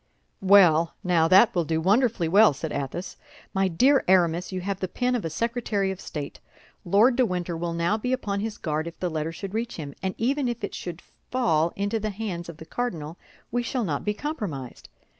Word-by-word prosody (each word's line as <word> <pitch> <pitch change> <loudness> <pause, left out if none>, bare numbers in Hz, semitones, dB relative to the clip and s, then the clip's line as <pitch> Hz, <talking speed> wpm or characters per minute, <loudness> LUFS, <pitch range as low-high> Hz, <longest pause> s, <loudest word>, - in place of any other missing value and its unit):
"Well, 180 -5 +5
now 170 -3 +3
that 195 +7 +6
will 175 - +1
do 160 0 -1
wonderfully 205 0 +2
well," 200 +1 +6
said 150 +3 -5
Athos. 140 +6 -4 0.4
"My 195 0 +2
dear 260 - +3
Aramis, 180 -1 +3
you 185 -1 -3
have 195 +1 -3
the 185 - -2
pen 250 +6 -1
of 245 - -1
a 165 - -2
secretary 220 0 -1
of 190 - -7
state. 145 -2 -6 0.4
Lord 210 +8 +4
de 255 - +3
Winter 180 -5 -2
will 170 +1 -3
now 170 +6 +1
be 250 +3 -2
upon 205 -6 -1
his 215 0 -4
guard 155 +1 -2
if 170 - -9
the 180 -2 -2
letter 160 0 -2
should 195 +4 -7
reach 230 +2 -3
him; 145 -4 -6
and 190 0 -2
even 270 +3 0
if 240 -2 -4
it 200 - -3
should 175 -1 -7 0.3
fall 170 -11 +2
into 205 +3 -1
the 215 0 -2
hands 190 -5 -5
of 165 - -9
the 160 - -10
cardinal, 165 -8 -4 0.3
we 245 +1 0
shall 240 +1 -2
not 150 -8 -2
be 210 0 -1
compromised. 205 - -5
190 Hz, 210 wpm, -25 LUFS, 165-225 Hz, 0.4 s, that